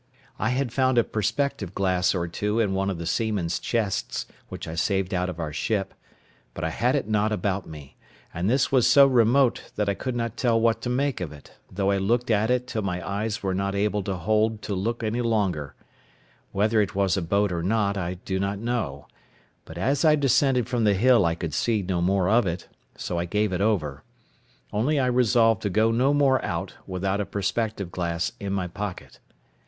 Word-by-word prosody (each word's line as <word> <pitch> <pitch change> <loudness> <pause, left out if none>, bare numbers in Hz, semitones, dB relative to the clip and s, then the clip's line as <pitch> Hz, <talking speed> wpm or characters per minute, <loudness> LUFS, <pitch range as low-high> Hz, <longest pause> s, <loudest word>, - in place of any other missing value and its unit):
I 110 - +1
had 125 -1 -1
found 130 -1 +2
a 120 - +6
perspective 110 -3 -2
glass 95 -1 +1
or 85 -2 -1
two 105 +6 -1
in 105 -4 +1
one 95 +1 0
of 95 - -3
the 85 - -5
seamen's 95 -3 -1
chests, 110 -5 -2 0.2
which - - -7
I 80 - -5
saved 95 +3 0
out 90 0 0
of 85 -2 -7
our 75 -2 -4
ship, 95 +6 -1 0.6
but - - -5
I - - -1
had - - +1
it - - -1
not 110 0 +1
about 100 -2 -1
me; 75 -3 -11 0.4
and 90 +4 -1
this 130 +3 +2
was 130 -3 +4
so 140 -1 +7
remote 125 0 +3
that 105 -1 -1
I 100 - +2
could 125 +5 -4
not 115 -1 -3
tell 115 -3 +2
what 115 0 +2
to 120 - -3
make 135 -2 0
of 85 -5 -4
it, 75 -2 -14 0.2
though 100 +1 0
I 100 - +1
looked 120 +5 +1
at 110 +1 +2
it 125 0 +1
till 115 -3 -3
my 90 -3 -3
eyes 105 +2 -2
were 95 -1 0
not 100 +1 -1
able 105 0 0
to 95 0 -3
hold 110 +4 0
to 105 - -3
look 115 +5 -2
any 115 +3 -1
longer; 100 - -1 0.8
whether 110 +2 +2
it 100 - -2
was 95 -3 +2
a 95 - -1
boat 100 +4 +1
or 85 -1 -2
not 100 +2 +1
I 90 -2 -3
do 95 +1 -4
not 100 +1 -1
know, 105 - -3 0.6
but 80 - -10
as 135 - +1
I 155 -2 +6
descended 135 -3 +2
from 120 -2 0
the 105 -2 +4
hill 120 0 +4
I 85 - 0
could 85 -3 -5
see 110 +2 0
no 90 -1 -1
more 95 +1 +2
of 110 0 +3
it, 85 +1 -4 0.3
so 85 - -3
I 85 - -1
gave 105 +2 0
it 90 - -1
over; 90 -10 0 0.7
only 125 +9 +1
I 130 - +2
resolved 120 -3 +3
to 105 - -1
go 110 +4 +2
no 125 +5 +2
more 140 -2 +3
out - - -3
without 95 +2 -1
a - - -2
perspective 100 -1 -2
glass 85 -1 -2
in 100 -1 -4
my 95 -2 -1
pocket. 95 +2 -7
105 Hz, 210 wpm, -25 LUFS, 95-115 Hz, 0.8 s, so